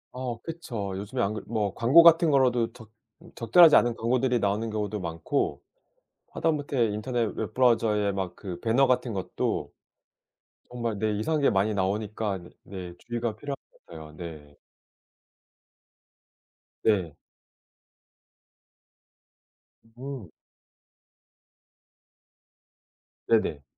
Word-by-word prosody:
어 125 -2 -4
그쵸. 120 - -5
요즘에 105 +6 -4
안 100 - 0
그 110 - -5
뭐 105 -3 -1
광고 135 +9 +6
같은 165 0 +6
거라도 125 -5 +2
적 110 -3 -15 0.4
적절하지 150 +8 +6
않은 120 -1 +2
광고들이 125 +2 +1
나오는 105 +2 -1
경우도 105 -1 -3
많고 85 - -2 0.7
하다못해 145 -6 0
인터넷 110 +1 -2
웹 - - -4
브라우저에 110 -5 +2
막 95 -2 -4
그 95 -4 -7
배너 120 +4 +3
같은 125 -2 0
것도 95 -2 -3 1.0
정말 120 -3 -3
네 110 +1 0
이상한 155 +8 0
게 140 - +4
많이 100 0 +2
나오니까 100 +1 -2 0.2
네. 90 -3 -8
주의가 120 -2 -3
필요한 140 +4 -5 0.2
것 - - -29
같아요. 80 -2 -11
네. 75 -4 -9 2.3
네. 95 -8 +1 2.8
음. 130 -7 -7 3.0
네네. 105 -10 +1
110 Hz, 215 characters per minute, -27 LUFS, 100-125 Hz, 3.0 s, 광고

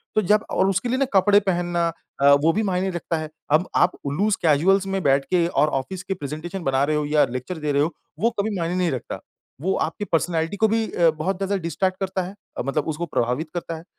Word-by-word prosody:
तो 215 - +4
जब 210 +3 +3
और 190 - +2
उसके 195 +5 0
लिए 255 - +1
ना 275 - +2
कपड़े 200 +1 +5
पहनना 175 -3 0 0.3
अ, 140 0 +7
वो 160 +2 +4
भी 220 - 0
मायने 190 -1 0
रखता 175 -2 -3
है। 155 -1 -5 0.2
अब 155 +5 +3
आप 180 - +4
उ 140 - -1
लूज़ 205 +7 +1
कैज़ुअल्स 180 +5 +3
में 195 0 -1
बैठ 135 -1 +3
के 180 -2 +2
और 150 -3 +2
ऑफिस 180 +7 -8
के 195 - -2
प्रेजेंटेशन 170 +3 -6
बना 135 -1 +2
रहे 150 +2 +1
हो 150 0 0
या 150 0 +3
लेक्चर 130 +8 -5
दे 150 -1 -2
रहे 140 0 +2
हो 160 +4 0 0.3
वो 230 - +3
कभी 205 +1 0
मायने 170 +1 -1
नहीं 180 -2 +1
रखता। 130 - -5 0.4
वो 190 +4 +1
आपकी 165 +6 -5
पर्सनैलिटी 165 +1 0
को 220 - +4
भी 225 +1 +1
अ, 170 -1 +4
बहुत 160 +5 -2
ज़्यादा 195 +1 -1
डिस्ट्रैक्ट 185 +3 -1
करता 190 -1 -1
है, 185 +3 -8 0.2
अ, - - -1
मतलब 140 +3 -1
उसको 160 +2 -2
प्रभावित 130 +1 -1
करता 170 -1 -4
है। 160 - -11
175 Hz, 240 wpm, -23 LUFS, 155-195 Hz, 0.4 s, अ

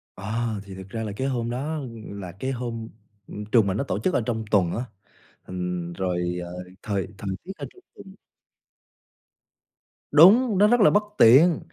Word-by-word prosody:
Ờ, 110 +2 -3
thì 95 -2 -10
thực 95 0 -10
ra 115 +1 -4
là 105 - -4
cái 130 +5 -2
hôm 120 -3 -2
đó 145 +6 -3 0.3
là 100 -3 -7
cái 130 +9 -4
hôm, 115 -3 -5 0.4
ừm, 105 0 -7
trường 110 -2 +3
mình 95 +2 -1
nó - - 0
tổ - - -3
chức 185 - 0
ở - - +2
trong 115 -2 -2
tuần 90 -5 +3
á, 120 +3 -3 0.6
ừm, 90 -1 -4
rồi, 90 -1 -2
ờ, 90 +1 -7 0.2
thời 100 -2 -2
thời 100 - -5
tiết 190 - -7
ở - - -6
trong 370 - -19
tuần 190 0 -13 2.0
Đúng, 200 - +6
nó 205 +2 +6
rất 245 +2 +3
là - - +7
bất 205 +1 +3
tiện, 150 +9 +6
115 Hz, 185 wpm, -24 LUFS, 95-140 Hz, 2.0 s, là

